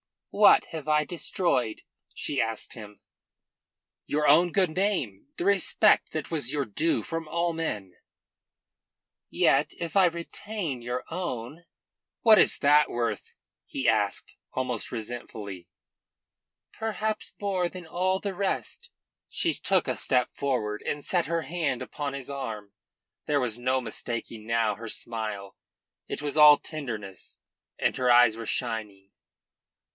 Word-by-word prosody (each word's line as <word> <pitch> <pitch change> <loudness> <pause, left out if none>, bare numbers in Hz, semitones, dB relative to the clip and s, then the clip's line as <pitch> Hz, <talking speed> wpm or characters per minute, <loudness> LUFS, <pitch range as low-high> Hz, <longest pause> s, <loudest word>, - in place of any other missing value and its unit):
"What 205 0 +6
have 160 -3 -7
I 150 0 +3
destroyed?" 150 - 0 0.3
she 140 - -1
asked 115 -1 -2
him. 105 -3 -11 1.0
"Your 150 +1 0
own 170 +4 +5
good 185 -4 +3
name; 155 - -1
the - - -2
respect 200 +2 +3
that 155 0 -4
was 145 -5 +1
your 145 -1 0
due 150 +9 0
from 165 -1 -4
all 170 +2 0
men." 105 - -4 1.3
"Yet 140 +2 +2
if 170 +3 -3
I 190 - +7
retain 170 - -3
your 120 +2 -3
own?" 165 -3 -5 0.6
"What 220 -3 +7
is - - +4
that 150 +1 +5
worth?" 120 0 -3 0.3
he - - -3
asked - - -1 0.2
almost 125 -3 -2
resentfully. 105 -5 -6 1.0
"Perhaps 220 -1 -3
more 190 -3 0
than 180 -1 -9
all 185 +3 0
the 200 -1 -3
rest." 195 +1 -3 0.4
She 330 - 0
took 190 -5 +1
a 125 -3 -1
step 125 +2 +1
forward 110 -7 -2
and 145 -1 -3
set 175 -2 +1
her 170 0 -1
hand 155 -4 -2
upon 145 -2 -4
his 140 -1 -6
arm. 115 -7 -5 0.6
There 145 -2 +2
was 120 -2 +1
no 130 +1 +1
mistaking 115 -1 -5
now 115 -2 +1
her 115 +3 -8
smile. 110 -3 -4 0.5
It - - -5
was 150 +1 -3
all 150 -1 +9
tenderness, 110 - -7 0.4
and - - +1
her 125 -1 +1
eyes 120 -2 +6
were 115 -1 -6
shining. 110 -5 -4
140 Hz, 135 wpm, -27 LUFS, 115-170 Hz, 1.3 s, all